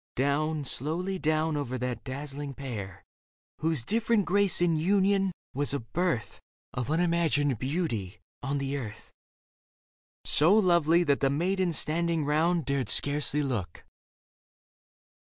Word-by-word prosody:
Down, 145 +3 0
slowly 175 +9 -1
down 155 0 +1
over 130 -3 -3
that 125 -1 -4
dazzling 140 +1 -6
pair, 105 -8 -7 0.6
Whose 155 -5 0
different 220 - +1
grace 200 +1 +3
in 175 -2 +2
union 195 +3 +2 0.2
was 140 +1 0
a - - -1
birth 120 - -2 0.3
Of 125 +1 -3
unimagined 160 -6 +1
beauty 130 - -3 0.2
on 140 +2 -2
the 140 0 -2
earth: 110 -6 -8 1.1
So 165 +7 +4
lovely 170 -4 +4
that 145 -4 +2
the 135 - +2
maidens 175 +4 0
standing 165 0 0
round 160 +2 +1
Dared 140 -1 -1
scarcely 145 +1 +1
look. 110 - -4
150 Hz, 120 wpm, -28 LUFS, 135-170 Hz, 1.1 s, So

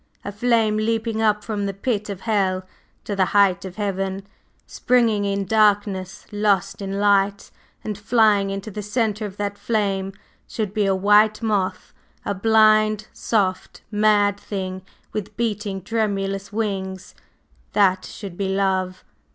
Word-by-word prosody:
"A 205 - -3
flame 220 0 +2
leaping 225 0 -1
up 210 -1 +2
from 205 -3 -2
the 195 - -4
pit 210 -1 -2
of 195 -2 -6
hell 195 -4 0 0.4
to 205 - -4
the 190 -1 +3
height 195 -2 +4
of 185 -1 -8
heaven, 195 -1 -3 0.4
springing 230 -5 +1
in 200 0 -1
darkness, 205 -2 +1
lost 205 -1 0
in 195 0 -3
light; 200 0 +2 0.3
and 215 -1 -3
flying 210 -1 +3
into 195 +2 -5
the 210 - -5
centre 210 0 -1
of 195 0 -12
that 205 0 -3
flame 195 -3 -1 0.3
should 210 -3 -3
be 210 -2 +1
a 195 - +2
white 210 +3 +4
moth 205 -4 -1 0.3
a - - -1
blind, 215 +1 +3
soft, 190 -4 -1
mad 205 -1 +3
thing 190 -2 -5 0.3
with 210 -3 -5
beating, 210 -4 -2
tremulous 195 -2 -2
wings, 195 -4 -3 0.6
that 190 -2 +3
should 195 -4 -8
be 195 +1 -2
Love! 190 -1 0
205 Hz, 145 wpm, -22 LUFS, 195-215 Hz, 0.6 s, height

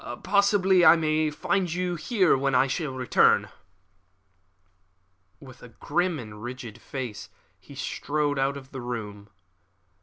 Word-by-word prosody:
Possibly 200 -2 +3
I 165 - +8
may 155 -1 0
find 175 +4 -1
you 180 +1 -2
here 185 +2 +2
when 135 0 0
I 130 +2 +4 0.2
return." 130 -3 +2 1.9
With 130 -3 -14
a - - -11
grim 175 -1 -1
and 105 -4 -10
rigid 120 -2 -8
face 125 -6 -7 0.3
he - - -15
strode 145 -1 -2
out 135 +1 0
of 130 -1 -12
the 130 - -7
room. 105 -4 -6
140 Hz, 125 wpm, -26 LUFS, 125-175 Hz, 1.9 s, I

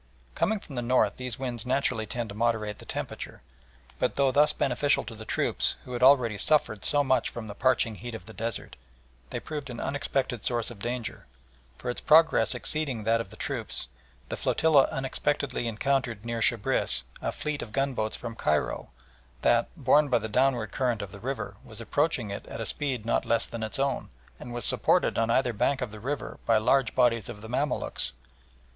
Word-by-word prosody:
Coming 220 - +1
from 150 - -12
the 120 - -2
north 125 +2 +2
these 125 -2 -3
winds 125 -3 -3
naturally 125 -4 0
tend 120 +1 -3
to 100 - -7
moderate 110 -2 0
the - - -12
temperature, - - -6 0.6
but - - 0
though 140 -1 +3
thus 145 +3 +5
beneficial 140 +2 +1
to 115 - -8
the 110 0 -9
troops, - - +1
who 125 - -7
had 120 - -3
already 125 -6 +5
suffered 110 -9 +2
so 145 -1 +5
much 130 -3 +2
from 120 - -7
the 105 - -7
parching 120 0 +2
heat 120 +2 -7
of 110 - -9
the 110 - -11
desert, 115 0 -4 0.5
they - - -3
proved 150 -3 -6
an 120 -1 -6
unexpected 135 -4 -1
source 120 -1 0
of 115 - -11
danger, 120 +2 -4 0.5
for, - - -9
its 120 - -2
progress 155 -8 +5
exceeding 140 -8 -1
that 115 +1 +2
of 100 - -8
the - - -12
troops, - - -3 0.4
the - - -2
flotilla 155 -4 +3
unexpectedly 135 -1 -1
encountered 120 -1 -1
near 115 -1 -2
Shebriss 100 - +1 0.2
a - - -1
fleet 150 -1 -3
of 110 - -7
gunboats 130 -4 0
from 120 -1 -6
Cairo 75 -8 -1 0.5
that, - - +4
borne 150 0 +4
by 125 - +4
the 110 -1 -3
downward 120 -2 +1
current 120 -5 0
of 100 - -8
the 100 - -10
river, 105 -4 -4
was 110 -1 -10
approaching 125 -2 0
it 100 - -6
at - - -7
a - - -2
speed 130 -6 -2
not 115 - +1
less 115 - +1
than 115 - -6
its 110 0 0
own, 135 -1 -1 0.3
and 120 - -8
was 120 -2 -1
supported - - +3
on 115 0 +1
either 120 0 +2
bank 130 +6 +1
of 125 -4 -3
the 110 - -9
river 140 +6 -4
by 115 - +5
large 125 +2 +2
bodies 120 -4 +3
of 105 -3 -8
the - - -7
Mamaluks. 140 +5 -1
120 Hz, 195 wpm, -28 LUFS, 110-135 Hz, 0.6 s, thus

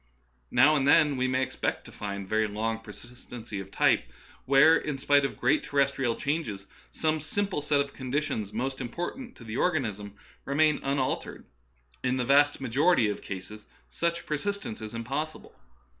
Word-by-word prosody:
Now 135 +5 +5
and 140 -2 +1
then 150 -1 +5
we 130 0 0
may 130 0 +1
expect 130 - -3
to - - -11
find 100 -1 -5
very 110 +1 +1
long 110 +2 -2
persistency 115 0 -9
of 95 0 -8
type - - +2 0.3
where, 140 +4 +6
in 150 -3 -2
spite 140 +1 +3
of - - -4
great 140 +5 +2
ter 145 - -5
restrial 135 -4 +1
changes, 130 -10 -2 0.2
some 155 0 0
simple 195 +2 -2
set 145 0 +1
of 140 0 -1
conditions 130 -6 -2
most 130 +5 -3
important 175 - -5
to - - -13
the 115 0 -5
organism 105 - -1 0.3
remains 150 +2 +2
unal 135 -1 0
tered; - - -10 0.6
but 130 - 0
in 130 - 0
the 125 - -1
vast 145 +2 +4
majority 135 -1 +3
of 105 - -4
cases 105 +2 -8 0.2
such 170 0 -1
per 150 - -1
sistence 200 - -4
is 110 +1 -6
impossible. 140 +7 -4
135 Hz, 175 wpm, -28 LUFS, 110-150 Hz, 0.6 s, where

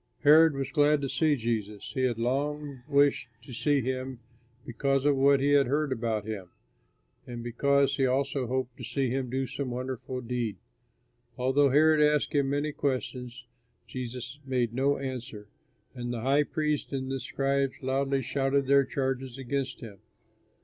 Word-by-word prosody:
Herod 155 +1 +6
was 135 -1 -3
glad 150 -1 +4
to 140 - -1
see 155 +1 +2
Jesus. 110 -4 -3
He 130 - -1
had 120 -3 0
long 140 +3 -2
wished 140 -3 +2
to 125 - -10
see 145 +4 +1
him 130 +1 -3 0.5
because 135 +3 0
of 145 -1 +4
what 140 +1 +4
he 140 +1 +2
had 140 -2 +5
heard 145 +2 0
about 115 -4 -1
him, 100 -5 -6 0.8
and 120 -1 -6
because 140 +3 +2
he 135 -1 +3
also 135 0 0
hoped 130 0 -2
to 125 - -9
see 130 +1 -1
him 130 -1 -2
do 130 +2 -1
some 135 0 -4
wonderful 130 +1 -4
deed. 120 -3 -3 0.8
Although 135 +3 +3
Herod 155 +3 +5
asked 150 -1 +2
him 140 -2 +2
many 145 +2 -1
questions, 125 -3 -3 0.4
Jesus 125 +2 -6
made 125 -4 -1
no 140 +3 +1
answer, 125 -6 -6 0.4
and 120 -1 -5
the 120 -2 -4
high 140 +4 +3
priests 150 -2 -2
and 135 -1 -3
the 135 - -2
scribes 135 +1 0
loudly 135 +1 0
shouted 135 +2 0
their 140 0 +4
charges 130 -1 -3
against 135 0 -3
him. 105 -5 -10
135 Hz, 165 wpm, -28 LUFS, 125-140 Hz, 0.8 s, Herod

